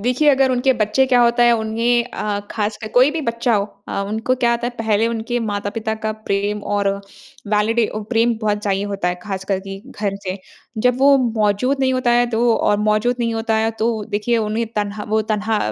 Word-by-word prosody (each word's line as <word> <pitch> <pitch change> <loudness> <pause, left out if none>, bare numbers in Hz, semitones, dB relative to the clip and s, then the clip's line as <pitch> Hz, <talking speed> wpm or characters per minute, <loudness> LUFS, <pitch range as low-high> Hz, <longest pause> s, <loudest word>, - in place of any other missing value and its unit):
देखिए, 250 +7 +2
अगर 270 -1 +3
उनके 255 +1 +2
बच्चे 230 +2 +2
क्या 250 -2 +4
होता 240 0 +4
है 240 0 +6
उन्हें 230 +2 +1
अ, 210 -4 -3
ख़ासकर 215 0 -3
कोई 255 +3 +6
भी 320 +1 -3
बच्चा 235 -1 0
हो 200 -1 +1 0.2
अ, - - -2
उनको 220 +4 0
क्या 245 -2 +1
होता 235 0 0
है, - - -2
पहले 220 -1 +1
उनके 235 +1 -2
माता-पिता 215 +1 -3
का 220 0 -3
प्रेम 205 -1 -2
और 205 -1 0 0.6
वैलिडी 215 +2 +2
ओ 215 - -3
प्रेम 230 +1 +3
बहुत 210 -1 0
चाहिए 200 -1 -1
होता 200 -3 -2
है, 180 - -1
ख़ासकर 195 -1 -2
के 195 0 -6
घर 205 -5 -3
से, 185 +1 -4 0.4
जब 250 +2 +2
वो 275 +1 +6
मौज़ूद 230 +2 +1
नहीं 260 -1 +2
होता 255 -1 +1
है 240 0 +4
तो 235 0 +2
और 210 - +2
मौज़ूद 215 +3 +1
नहीं 230 -1 0
होता 225 0 -1
है, 220 +1 +1
तो 225 -1 -2
देखिए, 210 +3 0
उन्हें 220 +1 -1
तन्हा 210 0 -2
वो 220 +1 +2
तन्हा, 215 0 -1
220 Hz, 205 wpm, -19 LUFS, 210-240 Hz, 0.6 s, है